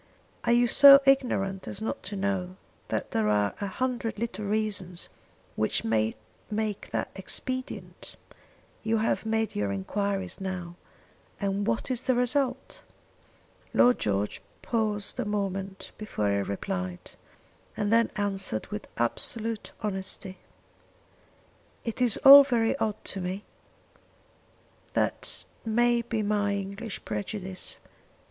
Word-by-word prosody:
Are - - +3
you 240 +1 +5
so 275 +3 +9
ignorant 195 -8 +2
as - - -3
not 220 - -3
to 205 +2 -2
know 190 -2 -2 0.3
that - - -3
there 110 -1 +1
are 105 -1 +2
a 200 - -1
hundred 240 +1 -2
little 215 -2 -3
reasons 200 -4 -2 0.5
which 110 - +1
may 110 0 +1 0.3
make 215 -1 -2
that - - -2
expedient? 255 +7 -4 0.7
You 225 0 +1
have 220 0 0
made 225 0 0
your 100 -1 0
enquiries 195 - -2
now 180 -2 -4 0.6
and 200 0 -1
what 230 +3 -1
is 250 -1 -1
the 260 -1 +1
result?" 265 - 0 0.9
Lord 245 0 +5
George 100 0 -1 0.2
paused 215 -1 -1
a - - +1
moment 195 -2 -3
before 105 - -1
he 100 - +1
replied, 95 -2 -4 0.7
and 210 +1 +1
then 230 0 +4
answered 195 - -1
with 105 - -5
absolute 220 - -1
honesty. 190 -2 -4 1.4
"It 230 +1 -4
is 240 -4 +4
all 280 +1 +12
very 240 -4 +1
odd 215 -6 0
to 195 - -2
me. 185 +3 -4 1.5
That - - -1 0.2
may 240 +1 +2
be 230 -2 -2
my 205 -1 +1
English 200 +2 -5
prejudice. 190 -2 -5
205 Hz, 125 wpm, -28 LUFS, 185-230 Hz, 1.5 s, all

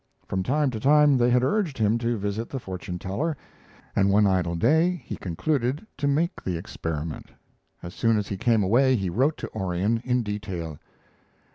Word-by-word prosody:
From 95 - -2
time 140 +6 +1
to 110 - -4
time 145 +3 +5
they 120 -1 +3
had 125 0 +3
urged 160 0 0
him 110 +1 +2
to 120 0 -1
visit 105 +3 -3
the 135 - -4
fortune 90 -4 -6
teller, 140 - -2 0.6
and 100 0 +3
one 105 +1 +4
idle 90 -3 +1
day 165 - +3
he - - -5
concluded 130 - -1
to 145 - -1
make 160 +6 0
the 90 -3 -2
experiment. 80 -3 -5 0.5
As 85 - -7
soon 115 -1 +2
as 105 -1 -2
he 100 - -3
came 110 +1 +2
away 130 +7 +4
he 95 -6 -1
wrote 135 - +1
to - - -7
Orion 95 +3 0
in 125 0 +1
detail. 95 -7 -5
115 Hz, 180 wpm, -25 LUFS, 95-135 Hz, 0.6 s, time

